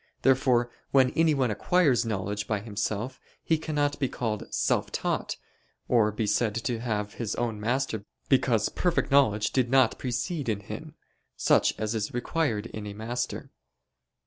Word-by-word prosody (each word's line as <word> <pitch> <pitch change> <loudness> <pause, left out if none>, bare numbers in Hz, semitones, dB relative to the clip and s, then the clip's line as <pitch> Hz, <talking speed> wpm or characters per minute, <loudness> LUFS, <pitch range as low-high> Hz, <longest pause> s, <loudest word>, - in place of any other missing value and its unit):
Therefore 125 -2 +3 0.2
when 130 -2 +4
anyone 145 -7 +2
acquires 130 - +2
knowledge 105 -1 -2
by 105 -2 0
himself, 105 +3 -3 0.2
he 160 -1 +2
cannot 145 -2 -1
be 135 -3 0
called 110 -4 -3
self - - 0
taught, - - -2 0.5
or 110 -4 +3
be 105 +1 -2
said 105 +1 +1
to 120 0 -2
have 105 -3 -2
his 115 -3 -3
own 115 -3 -2
master 115 -1 -1 0.2
because 120 -5 +3
perfect 175 -4 0
knowledge 110 -7 +4
did 125 -3 +1
not 130 -2 +4
precede 130 +3 -2
in 105 -2 -1
him, 130 +10 -8 0.4
such - - +3
as 110 0 -1
is 110 +1 -3
required 120 -4 -1
in 110 -2 -7
a 100 - -7
master. 120 +3 -4
120 Hz, 150 wpm, -27 LUFS, 105-135 Hz, 0.5 s, when